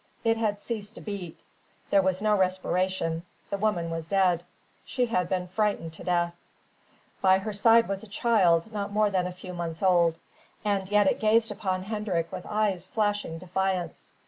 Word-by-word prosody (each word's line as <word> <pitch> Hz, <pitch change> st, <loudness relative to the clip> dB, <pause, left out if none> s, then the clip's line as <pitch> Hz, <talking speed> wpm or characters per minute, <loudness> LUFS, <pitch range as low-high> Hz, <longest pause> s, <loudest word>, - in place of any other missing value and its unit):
It 225 Hz, 0 st, +3 dB
had 215 Hz, -2 st, -1 dB
ceased 215 Hz, 0 st, -5 dB
to -, -, -10 dB
beat. 195 Hz, -6 st, -6 dB, 0.5 s
There 200 Hz, -, +6 dB
was 190 Hz, +1 st, 0 dB
no 215 Hz, -1 st, +4 dB
respiration. 185 Hz, -3 st, 0 dB, 0.3 s
The 200 Hz, -, 0 dB
woman 180 Hz, -6 st, 0 dB
was 165 Hz, -1 st, -4 dB
dead: 180 Hz, -2 st, +2 dB, 0.4 s
she 250 Hz, -2 st, 0 dB
had 180 Hz, -7 st, 0 dB
been 180 Hz, -1 st, -1 dB
frightened 200 Hz, -5 st, -1 dB
to -, -, -10 dB
death. 175 Hz, -1 st, +1 dB, 0.9 s
By 190 Hz, 0 st, +5 dB
her 210 Hz, +2 st, -4 dB
side 230 Hz, +3 st, +5 dB
was 195 Hz, -1 st, -3 dB
a -, -, -10 dB
child 200 Hz, -3 st, +2 dB
not 200 Hz, -1 st, -3 dB
more 210 Hz, 0 st, +2 dB
than 185 Hz, -2 st, +1 dB
a -, -, -5 dB
few 180 Hz, 0 st, -9 dB
months 170 Hz, 0 st, -5 dB
old. 175 Hz, -3 st, +4 dB, 0.5 s
And 195 Hz, -2 st, 0 dB
yet 210 Hz, 0 st, +4 dB
it -, -, +2 dB
gazed 220 Hz, +1 st, +3 dB
upon 185 Hz, -2 st, -2 dB
Hendrik 195 Hz, -5 st, -2 dB
with 185 Hz, -1 st, -7 dB
eyes 205 Hz, -4 st, 0 dB
flashing 205 Hz, -6 st, -1 dB
defiance. 185 Hz, -1 st, -3 dB
190 Hz, 175 wpm, -27 LUFS, 180-210 Hz, 0.9 s, There